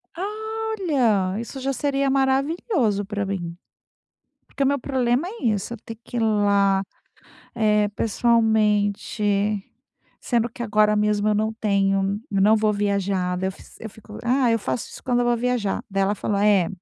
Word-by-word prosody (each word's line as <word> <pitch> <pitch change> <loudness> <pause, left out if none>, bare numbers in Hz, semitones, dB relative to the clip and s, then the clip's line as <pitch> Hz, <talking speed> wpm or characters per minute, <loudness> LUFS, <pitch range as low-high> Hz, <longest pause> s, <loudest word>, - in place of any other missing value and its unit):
Ah, 350 - -6 0.6
olha, 225 - +1
isso 250 +3 -7
já 270 +1 -1
seria 275 0 0
maravilhoso 270 - +1
pra 205 -1 -3
mim. 175 -3 -4 0.9
Porque 275 - -4
o - - +3
meu 280 +1 +2
problema 260 +4 0
é 435 - -9
isso, 215 0 0
eu - - -9
ter 225 - -8
que - - -8
ir 235 - +1
lá, 200 -3 +2 0.7
eh, 210 -2 +2
pessoalmente, 215 -2 +1 1.0
sendo 235 -1 0
que 240 - -10
agora 210 -1 +3
mesmo 210 0 +1
eu - - +3
não 220 +1 0
tenho 195 -2 +1
eu 195 -1 0
não 215 +3 +5
vou 215 -1 +2
viajar. 200 -3 0
Daí 190 - -1
eu 190 - -2
fiz - - -16
eu 220 - -7
fico: 210 0 -13
"Ah, 250 0 +2
eu 230 - +2
faço 130 -8 -3
isso - - -11
quando 245 -2 +1
eu - - 0
vou 240 -1 +2
viajar.", 240 -5 -1
daí 195 0 0
ela 205 +2 +1
falou: 200 0 -2
"É, 200 -4 +4
215 Hz, 175 wpm, -23 LUFS, 200-240 Hz, 1.0 s, não